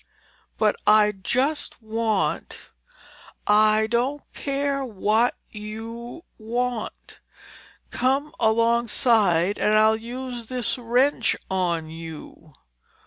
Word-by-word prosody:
"But - - +2
I 210 0 +6
just 255 - -1
want—" 220 -2 -2 0.7
"I 215 +1 +4
don't 245 +6 -1
care 280 0 -2
what 220 0 +1 0.2
you 225 +6 -8 0.2
want. 240 +1 -4 0.7
Come 270 +4 0
alongside, 220 -5 +2
and 215 0 +3
I'll 220 +1 +5
use 240 +1 -6
this 250 0 +1
wrench 245 0 +2 0.2
on 170 -4 -1
you!" 160 -1 -10
225 Hz, 85 wpm, -24 LUFS, 210-250 Hz, 0.7 s, I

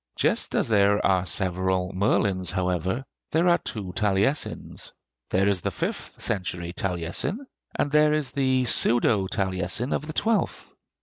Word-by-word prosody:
Just - - 0
as - - +2
there 100 -2 +3
are 95 -1 +2
several 95 0 -1
Merlins, 95 -1 +1
however, 95 - -1 0.2
there 165 +3 +2
are 175 -1 +4
two 95 -5 -6
Taliesins: 105 +7 -1 0.4
there 95 +2 +2
is 100 -3 +1
the - - -1
fifth - - -5
century 90 -2 -2
Taliesin, 90 - -2 0.3
and 145 - 0
there 150 0 +4
is 150 -4 0
the 130 -2 +1
pseudo 115 -4 +4
Taliesin 95 +6 -1
of 150 - -3
the 155 - -5
twelfth. 225 +5 -1
100 Hz, 140 wpm, -25 LUFS, 95-130 Hz, 0.4 s, are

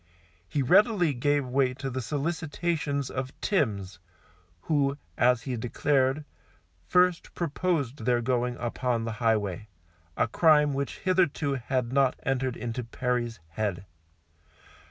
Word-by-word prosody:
He 145 - 0
readily 180 - +4
gave 145 +2 +1
way 130 0 +1
to 135 0 -5
the 130 +1 -3
solicitations 150 0 -2
of 130 0 -5
Timms, 100 - -1 0.6
who, 140 - +1 0.2
as 120 -1 +3
he 130 - -3
declared, 135 +4 +1 0.6
first 180 -1 +2
proposed 150 -7 -1
their 125 -1 +3
going 120 0 0
upon 120 -1 -1
the 115 - -2
highway, 105 -3 0 0.5
a - - +2
crime 150 +3 +4
which 140 0 -3
hitherto 175 -6 +1
had 125 -1 -2
not 135 -2 +3
entered 130 -2 -1
into 120 +1 -4
Perry's 120 -2 -2
head. 100 0 -3
130 Hz, 120 wpm, -28 LUFS, 120-145 Hz, 0.6 s, readily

